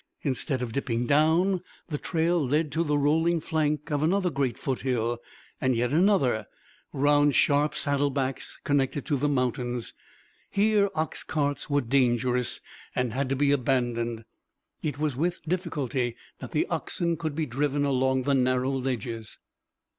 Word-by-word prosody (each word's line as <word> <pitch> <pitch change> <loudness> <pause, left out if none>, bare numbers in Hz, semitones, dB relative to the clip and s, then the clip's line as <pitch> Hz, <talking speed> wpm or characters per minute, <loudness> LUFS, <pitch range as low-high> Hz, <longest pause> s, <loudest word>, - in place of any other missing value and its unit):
Instead 135 -1 -1
of 120 - -4
dipping 120 -3 -1
down, 165 +7 +3 0.3
the 150 -3 -3
trail 170 -1 +1
led 150 +3 +1
to 160 +3 +1
the 150 -2 +1
rolling 160 +4 +2
flank 155 -1 -1
of 145 -1 +1
another 180 +3 +2
great 135 -5 -1
foothill, 120 -3 -1 0.4
and 130 -1 +2
yet 120 +1 0
another, 150 - +3 0.4
round 145 +1 +3
sharp 145 +1 +3
saddlebacks 140 -2 -1
connecting 140 -1 +1 0.2
the 145 +2 +1
mountains. 125 -3 -1 0.6
Here, 205 0 +3
ox 155 0 -2
carts 145 -2 -2
were 145 0 +2
dangerous 125 -1 +1 0.3
and 125 -3 0
had 135 +1 -1
to 135 - +1
be 140 +1 +2
abandoned. 120 -4 0 0.6
It 150 -2 -2
was 150 -3 -1
with 175 +6 -1
difficulty 145 -8 -2 0.2
that - - -8
the - - +1
oxen 170 -1 -1
could 155 -2 -4
be 160 0 0
driven 145 +2 0
along 130 -1 +1
the 140 - +1
narrow 130 0 +2
ledges. 120 -4 -3
140 Hz, 145 wpm, -27 LUFS, 125-155 Hz, 0.6 s, down